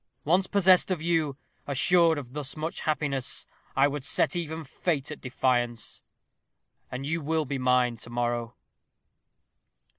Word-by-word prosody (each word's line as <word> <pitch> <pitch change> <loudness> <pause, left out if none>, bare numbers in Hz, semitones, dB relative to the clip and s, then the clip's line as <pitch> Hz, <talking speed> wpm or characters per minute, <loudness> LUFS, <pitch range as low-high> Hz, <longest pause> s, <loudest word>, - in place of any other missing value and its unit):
Once 180 +5 +3
possessed 190 -2 +4
of 185 -3 0
you, 160 -4 0 0.3
assured 165 +4 +4
of 130 -3 -7
thus 145 -1 -4
much 160 +2 -3
happiness, 145 -4 -1 0.3
I 135 +1 +5
would 145 -1 -4
set 160 - +2
even 160 -2 -3
fate 150 0 -2
at - - -8
defiance. 120 -3 -1 0.9
And 130 +2 -5
you 165 +3 -1
will 160 +1 0
be 135 0 -3
mine 125 -2 +2
to 115 - -8
morrow." 120 0 -2
145 Hz, 140 wpm, -27 LUFS, 125-165 Hz, 0.9 s, I